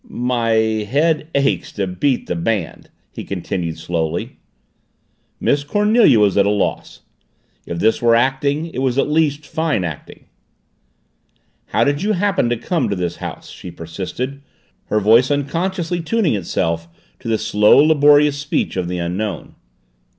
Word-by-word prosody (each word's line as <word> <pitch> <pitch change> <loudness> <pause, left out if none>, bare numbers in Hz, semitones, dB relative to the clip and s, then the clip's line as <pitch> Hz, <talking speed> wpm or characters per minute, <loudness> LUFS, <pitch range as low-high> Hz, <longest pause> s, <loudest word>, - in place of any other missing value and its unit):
"My 120 -1 -1
head 110 +9 +1
aches 140 0 0
to 100 - -2
beat 105 +9 -1
the - - -3
band," 95 +1 -3 0.2
he - - -7
continued 90 -3 -4
slowly. 80 -1 -3 1.0
Miss 145 0 +1
Cornelia 210 - +4
was 105 -2 +3
at 100 0 +4
a - - +3
loss. 105 -1 -2 0.7
If 85 - -4
this 110 +5 +1
were 115 -1 +4
acting, 135 +5 +1
it - - -4
was 130 -1 0
at 140 - +2
least 150 -1 0
fine 155 - -1
acting. 80 -4 -8 1.4
"How 110 +3 +1
did 145 +4 0
you 210 +2 +1
happen 195 - +1
to 120 - 0
come 130 - -1
to 100 - -1
this 90 -2 -3
house?" - - -8
she 90 - -10
persisted, 95 +12 -6 0.4
her 105 - 0
voice 115 +5 +4
unconsciously 170 +5 -1
tuning 190 - 0
itself 85 -3 -2 0.3
to - - -10
the 110 -1 +1
slow, 105 0 +4
laborious 145 -1 +5
speech 140 0 -2
of 90 -2 -1
the 90 0 -3
Unknown. 90 +2 -4
120 Hz, 150 wpm, -19 LUFS, 100-145 Hz, 1.4 s, laborious